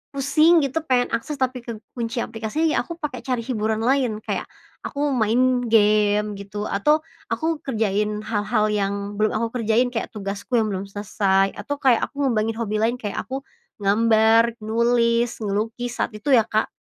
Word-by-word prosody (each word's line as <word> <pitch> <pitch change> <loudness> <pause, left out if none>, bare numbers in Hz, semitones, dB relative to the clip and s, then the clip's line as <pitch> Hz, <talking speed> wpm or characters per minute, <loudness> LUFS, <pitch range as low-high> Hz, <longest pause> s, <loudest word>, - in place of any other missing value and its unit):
pusing 310 +4 +4
gitu, 275 +3 -1
pengen 250 -1 +2
akses 260 +6 -2
tapi 255 -1 0
kekunci 235 +1 -5
aplikasi, 230 +8 -1
ya - - +2
aku 335 - -7
pake 290 -5 -4
cari 250 -3 -2
hiburan 220 -2 -1
lain. 250 -3 +1
Kayak - - -3 0.3
aku 290 0 -2
main 250 +2 +2
game 210 -1 +3
gitu, 205 +1 -6
atau 300 +12 +2 0.2
aku 320 -1 -1
kerjain 210 -3 -1
hal-hal 215 0 0
yang 200 -1 0 0.3
belum 215 0 +2
aku 230 +2 -2
kerjain 230 +3 +2
kayak 230 -2 -2
tugasku 200 +3 -4
yang 215 -1 0
belum 195 0 -4
selesai, 195 -1 +1
atau 245 +8 -4
kayak 255 -5 +3
aku 285 0 -4
ngembangin 225 -3 0
hobi 215 -2 -2
lain 225 +3 +1
kayak 215 -5 -4
aku 270 +1 -4 0.4
ngambar 225 +2 +4
nulis, 235 +1 +2
ngelukis 225 +4 -3
saat - - +1
itu 210 +7 -2
ya, 230 -3 +5
Kak. 215 0 0
225 Hz, 165 wpm, -23 LUFS, 210-255 Hz, 0.4 s, ya